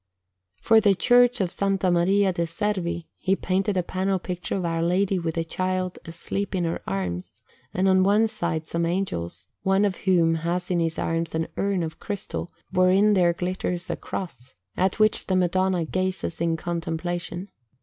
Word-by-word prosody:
For 225 - +4
the 200 -2 +4
Church 245 +3 +4
of 185 - +1
S. - - -14 0.2
Maria 185 +2 +3
de' 170 -1 -1
Servi 175 -3 -2
he 190 +1 +2
painted 195 +1 0
a 180 - +2
panel 190 +2 0
picture 180 -1 -4
of 185 -2 -2
Our 165 -1 -1
Lady 185 +3 +1
with 165 -2 -3
the 165 - 0
Child 185 +2 -2
asleep 185 +4 -4
in 180 - 0
her 165 0 -2
arms, 90 -2 -4 0.3
and 185 +1 +1
on 190 0 +5
one 205 +4 +4
side 170 -7 -3
some 170 +1 -1
Angels, 95 - -3
one 195 +2 +3
of 195 -2 -1
whom 170 -4 +3
has 175 +2 -2
in 175 - +2
his 165 -1 -1
arms 165 0 -1
an 160 0 -1
urn 195 -3 0
of 160 -1 -6
crystal, 200 -4 -5 0.2
wherein 190 +3 +4
there 175 -3 +4
glitters 180 0 -3
a - - -1
Cross, 135 - -7 0.2
at 185 +1 +1
which 215 0 +3
the 185 - +1
Madonna 185 -1 +2
gazes 185 -1 -2
in 165 -1 +1
contemplation. 175 +2 -3
180 Hz, 175 wpm, -25 LUFS, 170-190 Hz, 0.3 s, on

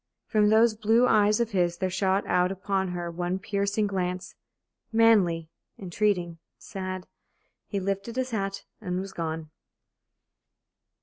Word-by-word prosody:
From 210 -2 +3
those 220 +1 +5
blue 225 +3 +3
eyes 210 +1 +4
of 235 -1 0
his 175 -3 +1
there 185 0 -1
shot 190 +1 +1
out 180 +1 +2
upon 195 0 -1
her 175 -1 -4
one 175 +2 -2
piercing 200 +2 -1
glance 185 -2 -3 0.6
manly, 195 -8 +3 0.3
entreating, 180 -3 -1 0.2
sad. 185 -1 -6 0.6
He 200 - -2
lifted 195 +4 -3
his 260 0 -2
hat 195 -2 -3 0.2
and 180 -3 -2
was 190 0 -6
gone. 160 -1 -4
195 Hz, 130 wpm, -27 LUFS, 180-210 Hz, 0.6 s, those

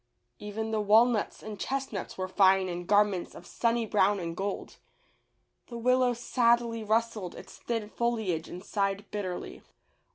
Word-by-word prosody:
Even 220 +2 -4
the 215 -1 0
walnuts 220 +2 +3
and 210 -2 -7
chestnuts 270 -6 -3
were 185 0 -2
fine 190 0 +4
in 175 -1 -5
garments 205 -2 +2
of 175 - -11
sunny 230 +3 0
brown 205 -1 +2
and 165 -2 -4
gold. 195 +2 -4 0.9
The 235 - -7
Willow 250 +1 +3
sadly 235 -1 +1
rustled 220 -3 -1
its - - -11
thin 230 -3 -3
foliage 220 -8 -1
and 180 +2 -8
sighed 200 -1 -1
bitterly. 185 -4 -5
210 Hz, 140 wpm, -29 LUFS, 190-230 Hz, 0.9 s, fine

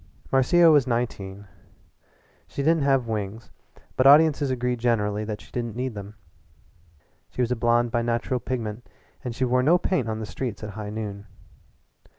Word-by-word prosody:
Marcia 160 +6 +5
was 145 -4 +4
nineteen. 100 -5 -3 1.0
She 140 - -4
didn't 165 +1 +3
have 135 -3 +2
wings, 110 0 -5 0.4
but 130 - +4
audiences 145 -1 +6
agreed 125 -1 -1
generally 105 -3 0
that 105 -1 -5
she - - -18
didn't 120 -3 -4
need 125 0 -3
them. 100 0 -9 1.1
She - - -4
was 120 - -2
a - - +2
blonde 120 0 +2
by 120 0 +1
natural 120 +2 -1
pigment, 115 -1 -5 0.3
and 120 -2 -5
she 130 - 0
wore 125 +1 +2
no 160 +7 +4
paint 175 -10 -1
on 110 0 -3
the 110 - -4
streets 115 -1 -5
at 105 - -5
high 105 0 -6
noon. 105 -2 -6
120 Hz, 165 wpm, -25 LUFS, 110-130 Hz, 1.1 s, audiences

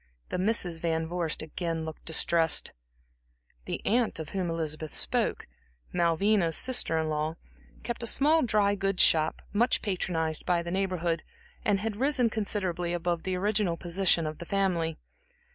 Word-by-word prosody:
The - - -2
Misses 185 -4 +2
Van 160 -1 -1
Vorst 170 -2 -2
again 165 0 -4
looked 160 -1 -9
distressed. 165 0 +2 0.9
The - - -5
aunt 235 +1 +2
of 160 -2 -6
whom 185 -3 -2
Elizabeth 155 -2 -3
spoke, - - +1 0.5
Malvina's 170 +1 +2
sister 250 -10 +3
in 160 0 0
law, 155 +1 -2 0.5
kept 240 0 -4
a 235 - +2
small 305 +7 +4
dry 210 -5 +2
goods 195 -1 +2
shop, 155 -1 +3
much 235 +4 +2
patronized 165 -5 -1
by 175 -1 +1
the 170 - -5
Neighborhood, 180 -3 -1 0.4
and 200 -2 +1
had 215 -1 -3
risen 255 -2 +2
considerably 185 -5 -1
above 175 -1 -1
the 185 +1 -2
original 200 -2 0
position 175 -1 +1
of 155 0 -5
the 170 - -7
family. 170 -5 0
175 Hz, 150 wpm, -28 LUFS, 165-205 Hz, 0.9 s, small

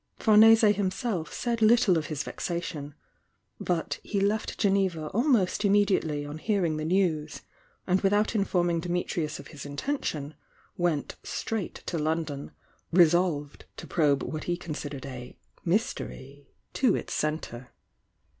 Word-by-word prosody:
Famese 220 0 +7
himself 195 -2 -2
said 235 -2 -2
little 220 -3 +5
of 160 -2 -1
his 155 -2 -3
vexation, 155 -4 -4 0.3
— - - -47 0.3
but 175 -2 -2
he 205 - -2
left 205 +2 0
Geneva 190 -6 +1
almost 230 -5 +2
immediately 195 -8 +2
on 145 +2 -7
hearing 180 -6 0
the 155 - -3
news, 155 -5 0 0.4
and 185 +1 +2
without 205 +3 +2
informing 175 -5 +1
Dimitrius 175 -2 -2
of - - -11
his 145 -4 -9
inten 145 - -3
tion, 145 0 -3 0.4
went 175 -5 -1
straight 220 -5 -4
to 170 - -2
London, 155 -2 -2 0.4
resolved 170 -4 +2
to - - -7
probe 145 -5 +2
what 155 - -5
he 175 0 -1
considered 150 -5 -6
a 125 -2 -8 0.3
"mystery" 145 - -3 0.2
to 260 - +3
its - - -4
centre. 140 -5 -3
175 Hz, 135 wpm, -28 LUFS, 150-200 Hz, 0.4 s, Famese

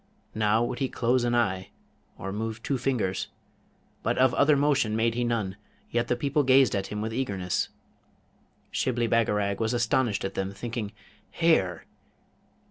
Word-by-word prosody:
Now 110 +1 +2
would 125 +1 -3
he 135 -2 0
close 120 +1 +1
an 120 0 +1
eye, 95 -5 0 0.5
or 95 - -5
move 110 +2 -4
two 135 -3 -1
fingers, 115 -8 -1 0.7
but - - 0
of 130 -1 +4
other 145 +2 +4
motion 140 -6 +2
made 115 +1 +2
he 120 +1 -1
none, 110 -5 -1 0.3
yet 120 0 0
the 125 - +1
people 140 +4 +1
gazed 130 -3 +5
at 95 -1 -1
him 105 0 -4
with 110 +1 -3
eagerness. 100 -8 -1 1.0
Shibli 120 -2 0
Bagarag 105 -4 +1
was 110 +1 0
astonished 120 -3 +1
at 95 - -3
them, 95 0 -3
thinking, 115 -1 -4 0.4
'Hair! 95 - +2
115 Hz, 155 wpm, -27 LUFS, 105-125 Hz, 1.0 s, gazed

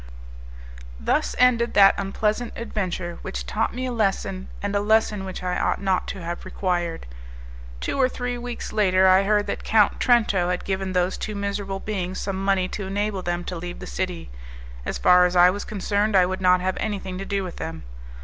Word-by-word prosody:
Thus - - 0
ended 240 -2 +3
that 195 -1 +8
unpleasant 210 +4 -1
adventure, 185 -6 -4
which - - -5
taught 60 - -1
me 255 +2 -4
a 255 - -2
lesson, 195 -4 -1
and 205 0 -2
a - - +3
lesson 210 -1 +2
which 185 -1 -6
I 180 0 -1
ought - - 0
not 190 -2 0
to 190 -3 -6
have 170 +1 -5
required. 175 -3 -2 0.7
Two 275 - -1
or 255 - +4
three 245 -1 -3
weeks 245 0 -6
later, 190 -3 +4
I 185 +1 +6
heard 205 +1 +2
that - - -4
Count 215 -2 +3
Trento 215 -7 +3
had 180 0 -2
given 190 -1 -2
those 180 0 0
two 215 - -4
miserable 200 -1 -3
beings 185 -3 -3
some 195 -1 -3
money 195 -2 +2
to 200 -2 -5
enable 200 0 -2
them 175 0 -2
to 180 - -5
leave 175 +1 -6
the 180 - -8
city; 180 - -4 0.6
as - - -2
far 180 0 +6
as 180 - -5
I 180 0 +7
was 205 +2 -4
concerned, 205 +1 0
I 185 -1 +6
would 185 +1 -3
not 180 -1 +4
have 185 0 -1
anything 195 -3 -3
to 195 - -5
do 200 -1 -1
with 180 -2 -7
them. 165 0 -6
195 Hz, 195 wpm, -24 LUFS, 180-210 Hz, 0.7 s, that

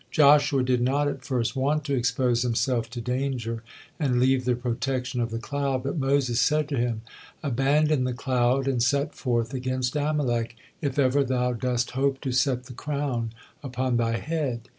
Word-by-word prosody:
Joshua 145 -2 +5
did 125 -1 +1
not 140 +4 +2
at 135 -2 -4
first 125 -1 -1
want 145 +3 +1
to 140 -1 -2
expose 125 -1 +1
himself 120 -1 0
to 120 +1 -6
danger 125 -2 -2 0.4
and 130 -6 +1
leave 130 0 +3
the 125 -1 +2
protection 125 +1 -2
of 115 - -1
the 115 - -3
cloud, 135 +1 -2
but 140 - -2
Moses 135 -3 +1
said 150 +5 +2
to 140 - -1
him, 120 -2 -1 0.4
"Abandon 140 +2 +2
the 125 - 0
cloud 125 +1 +1
and 130 -3 +1
set 140 +5 +1
forth 120 -1 -1
against 130 0 -2
Amalek, 130 -6 0 0.3
if 140 -3 -2
ever 140 0 +3
thou 125 -1 0
dost 125 0 -1
hope 135 +1 0
to 135 - -2
set 125 0 +1
the 125 0 -11
crown 135 -4 -2 0.3
upon 130 -2 -1
thy 115 0 +1
head." 145 -5 -2
130 Hz, 175 wpm, -26 LUFS, 120-140 Hz, 0.4 s, Joshua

